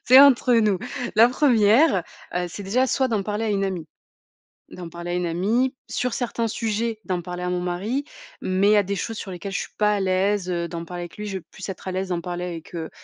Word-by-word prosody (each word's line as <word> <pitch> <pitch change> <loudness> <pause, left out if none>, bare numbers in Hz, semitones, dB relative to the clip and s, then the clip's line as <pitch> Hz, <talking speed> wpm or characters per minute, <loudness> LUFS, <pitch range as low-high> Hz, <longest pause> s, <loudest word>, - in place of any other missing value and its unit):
c'est 255 +2 +9
entre 260 -3 +6
nous. 215 -5 +3 0.4
La 230 +2 +8
1re, 235 - +4 0.3
heu, 180 0 0
c'est 205 - -7
déjà 240 +7 +2
soit 265 0 +1
d'en 220 -4 0
parler 210 +2 -2
à - - 0
une 195 -1 +1
amie. 180 -5 -3 0.8
D'en 180 -2 -8
parler 170 +1 -6
à - - -1
une 180 0 0
amie, 215 +11 +1
sur 250 -1 -1
certains 235 -2 -1
sujets 225 0 -2
d'en 180 -2 -2
parler 180 +1 -6
à 180 - -1
mon 180 0 0
mari, 195 +10 -2 0.4
mais 190 +2 +2
il - - +6
y - - +6
a 205 - +4
des 200 +1 -2
choses 225 +3 -4
sur 200 - -6
lesquelles 185 +2 -6
je 195 - -1
suis - - -6
pas 210 0 +3
à - - -1
l'aise, 190 0 +1
heu, 170 -1 -1
d'en 170 -1 -5
parler 175 +1 -6
avec 175 - -10
lui, 210 - -5
je 195 -2 -3
vais - - -18
plus 190 - -8
être 190 -1 -6
à - - -2
l'aise 190 +1 -2
d'en 175 -2 -1
parler 175 +1 -4
avec, 170 +1 -7
heu, 165 -2 -4
195 Hz, 255 wpm, -24 LUFS, 180-225 Hz, 0.8 s, c'est